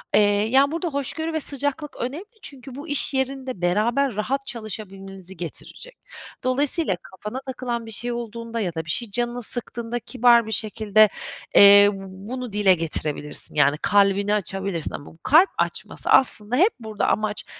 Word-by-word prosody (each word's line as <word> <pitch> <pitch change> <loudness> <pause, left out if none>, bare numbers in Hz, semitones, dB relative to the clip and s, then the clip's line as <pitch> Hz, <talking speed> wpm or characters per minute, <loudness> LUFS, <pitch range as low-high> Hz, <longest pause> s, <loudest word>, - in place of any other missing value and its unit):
eee, 210 - +6 0.3
yani, 270 +3 +4
burada 335 +2 -2
hoşgörü 315 +3 -2
ve 315 - 0
sıcaklık 285 +1 -2
önemli 280 +10 -5 0.2
çünkü 265 -2 -7
bu 290 +4 -8
iş 290 -1 +1
yerinde 265 -5 -3
beraber 225 +8 +1
rahat 270 +6 -2
çalışabilmenizi 195 -4 -6
getirecek. 475 - -8 0.5
Dolayısıyla 275 - +1
kafana 210 +7 -8
takılan 245 -3 -4
bir 225 - -9
şey 240 +3 -2
olduğunda 230 0 -5
ya 185 -6 -2
da 160 -1 -4
bir - - -10
şey 225 +6 -1
canını 240 +2 -2
sıktığında 235 0 -2
kibar 240 -1 +3
bir 220 - -7
şekilde, 215 -1 +3 0.5
eee, 200 0 +9
b - - -7 0.3
bunu 250 -3 -5
dile 205 -2 +4
getirebilirsin, 155 -3 -4
yani, 145 0 +3
kalbini 200 0 +3
açabilirsin 195 -4 -2
ama 145 - -7
bu - - -21
kalp 330 +7 +5
açması - - -3
aslında 230 -3 +4
hep 375 - +4
burada 220 -2 -3
amaç 215 0 -1
230 Hz, 155 wpm, -23 LUFS, 200-265 Hz, 0.5 s, eee